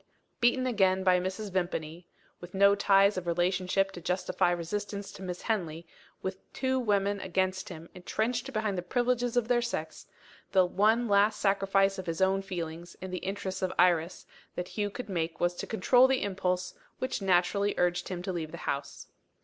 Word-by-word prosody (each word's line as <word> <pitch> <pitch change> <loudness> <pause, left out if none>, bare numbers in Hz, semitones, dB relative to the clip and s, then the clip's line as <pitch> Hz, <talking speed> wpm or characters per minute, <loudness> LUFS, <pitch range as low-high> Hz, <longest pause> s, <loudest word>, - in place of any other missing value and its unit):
Beaten 250 +2 +3
again 190 -6 +2
by 185 -1 +4
Mrs. 190 +3 -4
Vimpany 175 -2 -3 0.3
with 175 +1 -10
no 200 +1 +6
ties 200 0 +4
of 180 -1 -4
relationship 185 +3 +1
to 175 - -9
justify 180 +1 0
resistance 200 +4 -3
to - - -12
Miss 180 -1 -5
Henley; 170 -7 -2 0.4
with 190 0 -4
two 260 0 0
women 200 -3 +1
against 185 0 -1
him, 165 -2 -9
entrenched 225 +7 -2
behind 215 -4 -1
the - - -2
privileges 245 +5 0
of 235 -2 +2
their 240 -1 +3
sex 160 -10 -4 0.5
the 190 -2 +6
one 215 +6 +2
last 205 +1 +3
sacrifice 195 0 +2
of 185 - -7
his 165 -1 -2
own 190 +1 +3
feelings, 175 -2 -6
in 185 0 -7
the 180 - -3
interests 195 0 -4
of 185 -1 0
Iris, 175 -1 +2 0.3
that 180 - -4
Hugh 205 -1 -2
could 245 +4 -7
make 165 -4 -3
was 175 0 +2
to - - -5
control 245 +5 +4
the 265 -1 +1
impulse 185 -2 -1 0.2
which 255 -4 -3
naturally 195 +2 +2
urged 175 0 +1
him 180 -2 -4
to 185 - -3
leave 160 -3 -4
the 170 - -7
house. 140 - -4
190 Hz, 180 wpm, -29 LUFS, 180-205 Hz, 0.5 s, no